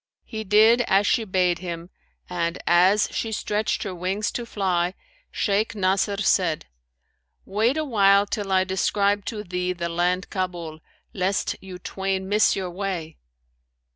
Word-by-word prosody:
He 220 -2 -6
did 220 +4 +5
as 195 +2 +3
she 225 +2 +2
bade 180 -3 +1
him 170 0 -6 0.4
and, 170 -1 -2
as 185 +4 +4
she 225 - -3
stretched 210 0 -1
her 195 - -4
wings 185 +4 -2
to 240 -1 -5
fly, 185 -4 0 0.3
Shaykh 210 +2 0
Nasr 195 +1 +1
said, 170 -5 +2 0.8
'Wait 220 +8 +1
a 310 - 0
while 200 -5 +4
till 205 -1 -4
I 185 0 +4
describe 200 +1 0
to 210 -2 -4
thee 180 -1 -2
the 170 -1 -4
land 180 +2 0
Kabul, 175 -4 -4 0.3
lest 190 +1 -1
you 190 -1 -9
twain 190 +1 -3
miss 210 +2 +3
your 185 -2 -3
way.' 175 -4 -4
190 Hz, 145 wpm, -24 LUFS, 180-205 Hz, 0.8 s, did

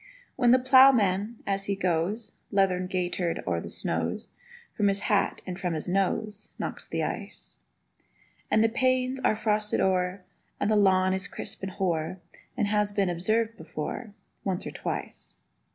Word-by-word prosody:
When 245 - +3
the 250 - +7
ploughman, 240 -5 +5
as 195 0 -1
he 200 - -1
goes 185 +4 -1 0.2
Leathern 185 -2 +2
gaitered 180 -2 -1
o'er 85 -2 0
the - - -7
snows, 80 - -2 0.4
From 205 - +1
his 200 0 +1
hat 205 -1 +1
and 185 0 -5
from 175 -3 -1
his 155 - -2
nose 200 +3 -1
Knocks - - -5
the - - -2
ice; - - -6 0.9
And 220 - +4
the - - +5
panes 255 +1 +1
are 235 - +2
frosted 210 -1 0
o'er, 185 0 +1 0.4
And 215 - +1
the - - +4
lawn 190 -2 +4
is 190 +1 -2
crisp - - -5
and 190 -1 -5
hoar, 175 -2 -1 0.4
As 220 - +2
has 210 0 +2
been 200 -2 +1
observed 220 +6 0
before 165 +7 -6 0.3
Once 190 -2 -2
or - - -4
twice. - - -5
195 Hz, 160 wpm, -27 LUFS, 185-215 Hz, 0.9 s, the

